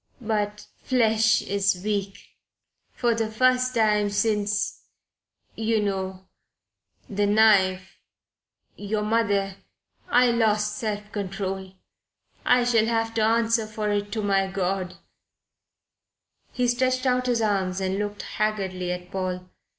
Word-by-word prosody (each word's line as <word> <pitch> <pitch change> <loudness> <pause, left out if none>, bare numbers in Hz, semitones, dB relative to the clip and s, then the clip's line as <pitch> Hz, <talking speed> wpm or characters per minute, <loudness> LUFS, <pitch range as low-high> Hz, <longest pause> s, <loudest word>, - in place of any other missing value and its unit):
But 210 -3 -2 0.2
flesh 225 -3 +3
is 195 -2 0
weak. 200 -2 -2 0.7
For 240 -2 +1
the 225 -1 -1
first 255 +2 +2
time 210 -2 +3
since 210 0 -1 0.7
you 225 0 0
know 190 -2 -3 0.8
the 205 -2 0
knife 195 -3 +3 0.8
your 210 +1 -2
mother 205 -3 0 0.5
I 245 0 +4
lost 215 -2 +1
self 210 -1 -4
control. 190 -1 -4 0.7
I 250 0 +4
shall 230 -2 +3
have 225 -1 0
to 225 - 0
answer 225 0 +2
for 215 -1 -3
it 205 0 -1
to 220 - -2
my 195 -1 +2
God 190 -1 -2 0.8
" - - -48
He 250 -1 0
stretched 255 +1 +1
out 250 0 +1
his 235 -2 +1
arms 195 -3 0
and 190 +1 -1
looked 205 0 -4
haggardly 190 -4 -2
at 180 0 -6
Paul. 185 -1 -4
210 Hz, 120 wpm, -25 LUFS, 195-225 Hz, 0.8 s, I